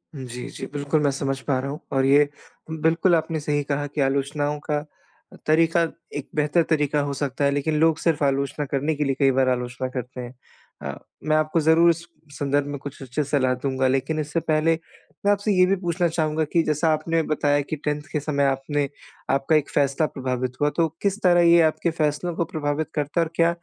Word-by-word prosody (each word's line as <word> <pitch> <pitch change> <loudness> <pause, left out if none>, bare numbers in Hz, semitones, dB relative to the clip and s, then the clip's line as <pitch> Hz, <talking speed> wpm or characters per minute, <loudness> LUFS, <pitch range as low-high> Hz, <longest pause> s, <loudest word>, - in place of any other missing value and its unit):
जी, 125 -2 -7
जी, - - -7
बिल्कुल, 145 +2 0
मैं 145 - +3
समझ 135 0 -2
पा 135 - +2
रहा 135 +2 -3
हूँ, 150 - -6
और 135 -1 +2
ये 145 +1 +5 0.4
बिल्कुल 165 +3 +2
आपने 160 0 -1
सही 145 0 -1
कहा 145 0 -2
कि 145 +1 -3
आलोचनाओं 145 +2 0
का 150 0 -2 0.6
अ, - - -11
तरीक़ा 165 +2 +3 0.4
एक 145 - -6
बेहतर 150 +3 +2
तरीक़ा 150 -2 +2
हो - - -2
सकता 140 0 -2
है, 140 - +3
लेकिन 145 +2 0
लोग 160 -1 +4
सिर्फ़ 160 -3 +1
आलोचना 140 +1 0
करने 145 +3 -1
के 150 - 0
लिए 135 -2 0
कई 135 -2 +5
बार 130 0 +2
आलोचना 125 +1 -2
करते 125 0 -5
हैं। 120 0 -8 0.5
अ, 70 - -3 0.3
मैं 155 - +3
आपको 155 +2 +1
ज़रूर 160 +2 +5
इस 165 0 +1 0.4
संदर्भ 145 0 +1
में 145 - -4
कुछ 140 0 -9
उचित 135 +3 -2
सलाह 130 -3 +1
दूँगा, 130 -1 +1
लेकिन 135 +4 0
इससे 150 +2 -1
पहले 160 0 +2 0.5
मैं 205 - +5
आपसे 205 +1 +1
ये 185 -1 +5
भी 190 +2 +2
पूछना 175 -1 0
चाहूँगा 155 -1 0
कि 170 - +4
जैसा 155 +1 +1
आपने 165 +2 0
बताया 145 -1 +1
कि 145 - -4
10th 150 0 -2
के 150 - 0
समय 140 -1 0
आपने 140 +1 0 0.4
आपका 135 +3 +2
एक 150 -2 +1
फ़ैसला 140 +2 +1
प्रभावित 130 -2 -3
हुआ। 145 - +4
तो 165 -1 +3
किस 200 +1 0
तरह 175 -1 +5
ये 170 0 +6
आपके 160 +2 +1
फ़ैसलों 155 +3 0
को 170 - 0
प्रभावित 155 -2 -2
करता, 150 +3 0
और 165 0 -1
क्या 170 0 +4
150 Hz, 210 wpm, -24 LUFS, 140-160 Hz, 0.6 s, ये